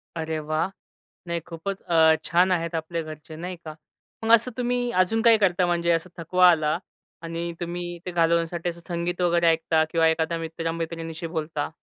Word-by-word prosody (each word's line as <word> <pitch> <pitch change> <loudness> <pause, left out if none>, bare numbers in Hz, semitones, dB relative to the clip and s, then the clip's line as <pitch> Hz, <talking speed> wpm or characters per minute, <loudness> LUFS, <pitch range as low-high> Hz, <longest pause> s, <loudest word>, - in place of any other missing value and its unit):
अरे 160 -1 -3
वाह! 155 +3 -1 0.6
नाही 170 0 -1
खूपचं 185 +4 -6
अ, 160 -1 +6
छान 180 +2 +3
आहेत 170 -1 0
आपले 165 +1 -3
घरचे, 155 0 -10
नाही 180 +3 -5
का. 155 - -6 0.5
मग 225 - +1
असं 235 +3 -2
तुम्ही 245 0 0
अजून 225 +5 +1
काही 230 -1 +6
करता 185 -3 +2
म्हणजे 170 -1 +1
असं 165 +2 0
थकवा 180 +2 +4
आला 155 -2 +1 0.5
आणि 170 +1 -4
तुम्ही 175 0 -4
ते 180 - -4
घालवण्यासाठी 170 0 +1
असं 170 0 -8
संगीत 175 +1 -2
वगैरे 170 -1 +3
ऐकता 160 -1 +3
किंवा 165 -1 +3
एखाद्या 160 +1 0
मित्रमैत्रिणीशी 165 0 -4
बोलता? 160 -2 -3
170 Hz, 165 wpm, -25 LUFS, 160-175 Hz, 0.6 s, अ